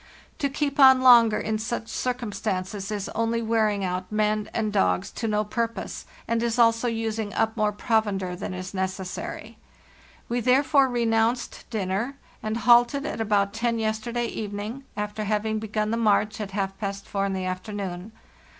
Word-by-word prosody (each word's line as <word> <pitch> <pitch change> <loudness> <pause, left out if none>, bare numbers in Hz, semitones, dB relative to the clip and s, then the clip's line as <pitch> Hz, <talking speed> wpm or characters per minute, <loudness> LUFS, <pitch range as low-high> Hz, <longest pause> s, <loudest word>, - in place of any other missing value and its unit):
To 280 - +1
keep 285 0 -2
on 265 -1 +8
longer 235 -4 +7
in 215 0 -2
such 225 +1 -3
circumstances 210 -6 -3
is 205 -2 -3
only 230 +1 -1
wear 220 -1 +2
ing 200 -1 -2
out 185 +1 -3
men 215 0 0
and 215 -2 -1
dogs 195 -1 +1
to 230 - -3
no 210 0 +1
purpose, 230 +2 -4 0.2
and 230 0 0
is 235 0 0
also 230 0 +4
using 225 -2 -2
up 220 0 +1
more 210 -2 +1
provender 205 -4 0
than 180 - -5
is 185 +1 -6
necessary. 190 +3 -4 0.7
We 240 +1 -1
therefore 265 +3 +4
re 240 -1 0
nounced 225 +2 0
dinner, 215 +4 -2 0.3
and 215 +1 -2
halted 240 +4 +4
at 230 - -3
about 205 -2 +1
ten 230 0 0
yesterday 225 +2 -1
even 205 -3 -4
ing, 230 +7 -6
after 210 +1 -3
having 215 +1 0
begun 215 0 -2
the 230 - 0
march 210 -1 +2
at 205 - -4
half 195 -1 -2
past 200 -1 -4
four 200 -1 -1
in 195 - -2
the 185 -1 -2
afternoon. 185 +1 -5
220 Hz, 170 wpm, -25 LUFS, 205-230 Hz, 0.7 s, on